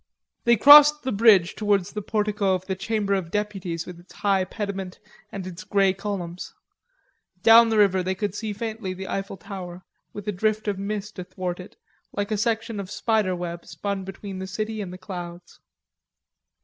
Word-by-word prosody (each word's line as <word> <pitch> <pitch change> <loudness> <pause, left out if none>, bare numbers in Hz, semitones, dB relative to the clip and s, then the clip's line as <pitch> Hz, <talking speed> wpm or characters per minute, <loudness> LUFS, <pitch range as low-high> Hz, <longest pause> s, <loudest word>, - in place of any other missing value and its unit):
They 235 -1 +5
crossed 295 +3 +9
the 260 - -2
bridge 200 -4 +5
towards 205 -4 0
the 210 - -4
portico 205 -2 0
of 185 0 -6
the 190 - -2
Chamber 205 0 -1
of 190 -4 -1
Deputies 190 -5 -3
with 180 -2 -10
its 175 - -19
high 195 -2 +1
pediment 195 -2 -5 0.3
and 195 -2 -6
its 185 +2 -8
grey 200 -2 +2
columns. 185 -3 -6 0.9
Down 230 0 +8
the 220 - +1
river 195 -3 +4
they 190 +1 -2
could 205 -1 -3
see 215 +1 -4
faintly 215 -2 -5
the 190 +1 -7
Eiffel 195 0 -4
Tower 180 0 -8 0.3
with 205 -1 -9
a - - +1
drift 215 +2 -1
of 200 -2 -1
mist 210 0 -5
athwart 180 0 -5
it, 180 - -11 0.4
like 205 +1 -3
a 215 - +1
section 225 0 -1
of 190 -2 -6
spider 205 -2 0
web 175 -1 -5
spun 200 -1 -4
between 195 0 -8
the 190 - -5
city 215 +3 -4
and 190 -3 -6
the 185 - -8
clouds. 175 -2 -9
200 Hz, 180 wpm, -24 LUFS, 185-215 Hz, 0.9 s, crossed